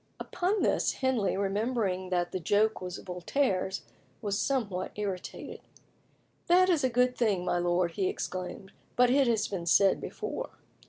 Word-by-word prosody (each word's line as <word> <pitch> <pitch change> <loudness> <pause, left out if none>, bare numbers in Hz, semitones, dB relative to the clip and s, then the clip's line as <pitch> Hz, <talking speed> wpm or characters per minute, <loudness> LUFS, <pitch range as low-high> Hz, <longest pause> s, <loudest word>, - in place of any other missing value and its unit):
Upon 385 +4 -1
this - - +2
Henley, 255 -8 0
remembering 200 -2 -1
that 175 -1 0
the 185 - -2
joke 205 +5 +2
was 180 0 -5
Voltaire's, 190 +1 -1 0.4
was 205 -1 -2
somewhat 205 -9 -1
irritated. 195 -3 -5 0.9
"That 365 +2 +5
is 330 -6 +2
a 260 - +3
good 250 +1 +2
thing, 200 -7 +1
my 175 -1 +1
lord," 175 0 +1
he 190 +2 -1
exclaimed, 185 +1 -5 0.2
"but 245 0 +4
it 275 0 +4
has 225 -3 +1
been 175 -4 -5
said 195 +3 +4
before." - - -5
200 Hz, 150 wpm, -29 LUFS, 185-250 Hz, 0.9 s, That